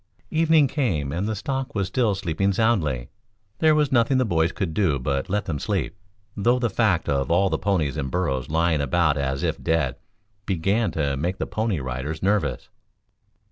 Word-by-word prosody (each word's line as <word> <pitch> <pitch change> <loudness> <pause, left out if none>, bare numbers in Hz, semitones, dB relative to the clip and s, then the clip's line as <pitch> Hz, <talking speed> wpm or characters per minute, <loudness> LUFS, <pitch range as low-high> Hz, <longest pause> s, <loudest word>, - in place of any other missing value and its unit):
Evening 160 -2 +4
came 100 - -1
and 90 +7 -2
the 110 - -1
stock 135 +5 -4
was 100 -2 +1
still 105 +1 +1
sleeping 95 +1 0
soundly. 85 - +1 0.5
There 155 -1 +4
was 150 -2 +2
nothing 125 +1 +3
the 130 - +2
boys 85 -4 +1
could 95 -7 -3
do 85 -8 +2
but 70 +1 -2
let 105 +2 -1
them 75 -5 -3
sleep, - - -2 0.4
though 120 +5 +2
the 120 -3 -1
fact 95 -6 +1
of 70 -1 0
all 95 +3 +3
the - - 0
ponies 85 -9 0
and 65 - -2
burros 65 -6 -1
lying 80 -1 +1
about 75 +3 +2
as 70 -1 -2
if - - -1
dead 80 -6 0 0.5
began 100 +5 +1
to 70 -3 0
make 85 +7 -2
the - - -2
Pony 110 -6 -1
Riders 65 +5 -4
nervous. 95 -11 0
90 Hz, 180 wpm, -24 LUFS, 70-110 Hz, 0.5 s, Evening